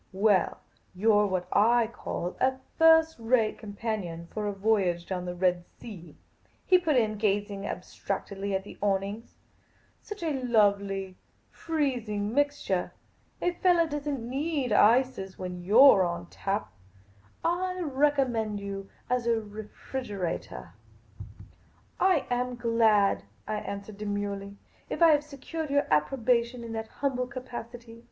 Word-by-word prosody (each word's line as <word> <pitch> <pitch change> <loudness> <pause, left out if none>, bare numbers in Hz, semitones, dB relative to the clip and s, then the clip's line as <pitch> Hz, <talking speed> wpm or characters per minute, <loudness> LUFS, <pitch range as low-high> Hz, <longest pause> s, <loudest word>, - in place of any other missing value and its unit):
" - - -39
Well, 195 -1 +2 0.4
you 215 +4 +3
're 205 0 +4
what 185 -2 -2
I 230 +3 +4
call 185 -5 -5
a 260 0 +2 0.2
first 320 0 +6
rate 225 -1 +1
companion 205 -6 -5
for 210 -1 -2
a - - 0
voyage 195 -4 +1
down 180 -2 -4
the 180 0 -4
Red 180 -1 +1
Sea," 175 -9 -11 0.5
he 365 - +5
put 315 -5 +1
in, 215 -3 +2
gazing 205 -1 -1
abstractedly 200 0 -4
at 190 - -2
the - - -12
awnings. 200 +2 -2 0.3
" - - -36
Such 420 -4 -8
a 295 -5 -1
lovely, 200 -5 +1 0.3
freezing 240 -10 -2
mixture! 285 -10 0 0.5
A 355 - +2
fellah 350 -1 +3
does 295 -1 -5
n't 280 -4 -2
need 275 +1 -2
ices 220 -2 +3
when 180 -1 -6
you 205 +7 +3
're 270 -8 +9
on 175 -1 -1
tap. 200 +2 -3 0.7
I 365 +2 0
recommend 265 -8 +1
you 195 -1 -6 0.2
as 250 -1 0
a 235 - +4
refrigeratah." 210 -2 -6 0.7
" - - -21 0.2
I 370 -7 +3
am 250 0 -1
glad," 230 -4 +3 0.3
I 215 - -1
answered 200 0 -7
demurely, 205 -1 -4 0.2
" - - -33
if - - -3
I 335 - +8
have 295 -2 +4
secured 300 +2 -6
your 285 0 +2
approbation 235 - +1
in 230 - -7
that 225 0 -4
humble 255 0 -2
capacity. 240 -2 -8
220 Hz, 145 wpm, -28 LUFS, 200-265 Hz, 0.7 s, re